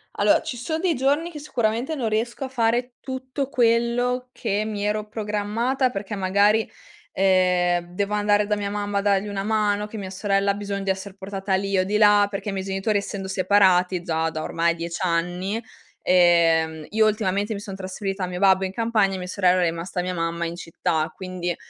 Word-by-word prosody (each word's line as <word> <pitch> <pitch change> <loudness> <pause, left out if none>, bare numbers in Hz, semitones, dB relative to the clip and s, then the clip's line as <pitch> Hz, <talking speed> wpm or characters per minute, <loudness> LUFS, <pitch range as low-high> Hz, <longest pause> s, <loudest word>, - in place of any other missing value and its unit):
Allora - - +3
ci 245 - -5
sono 315 +7 -3
dei 350 -2 +1
giorni 290 +7 +1
che 300 - -8
sicuramente 245 +1 -1
non 235 -6 -1
riesco 230 +5 -2
a 260 - -4
fare 240 0 0
tutto 260 +1 -4
quello 245 0 +1
che 205 +2 -1
mi 205 -2 -4
ero 210 0 -1
programmata, 220 +5 -1
perché 205 -2 -5
magari, 200 +3 +2 0.4
ehm, 180 -2 +2
devo 205 +1 -1
andare 205 0 +2
da 210 0 0
mia 200 -1 -2
mamma 205 0 -2
a 200 - +2
dargli 200 0 +1
una 195 -1 -3
mano, 210 -1 0
che 220 - -11
mia 195 -2 -5
sorella 195 +1 +1
ha - - -1
bisogno 200 -1 -4
di 195 - -3
esser 190 +1 -3
portata 195 0 -4
lì 195 0 0
o 185 - +2
di 210 +2 0
là, 205 -1 +5
perché 205 +1 -4
i - - -2
miei 190 0 -4
genitori 195 +2 0
essendo 200 -1 -4
separati 185 -2 +3
già 160 -2 -1
da 155 -1 -5
ormai 170 0 0
10 170 +1 -5
anni 180 +4 -1 0.4
ehm, 165 -3 +3
io 220 +1 +3
ultimamente 205 0 0
mi 200 - -5
son 200 -2 -7
trasferita 195 0 -4
al 180 - -2
mio 180 - -5
babbo 190 -1 +4
in 190 - -5
campagna, 220 -4 +1
e - - -4
mia 180 0 -6
sorella 185 -1 +2
è - - +3
rimasta 175 +2 -4
mia 180 0 -3
mamma 170 0 -2
in 170 +1 -4
città, 160 -2 -1
quindi, 180 -2 -4
200 Hz, 200 wpm, -23 LUFS, 185-215 Hz, 0.4 s, là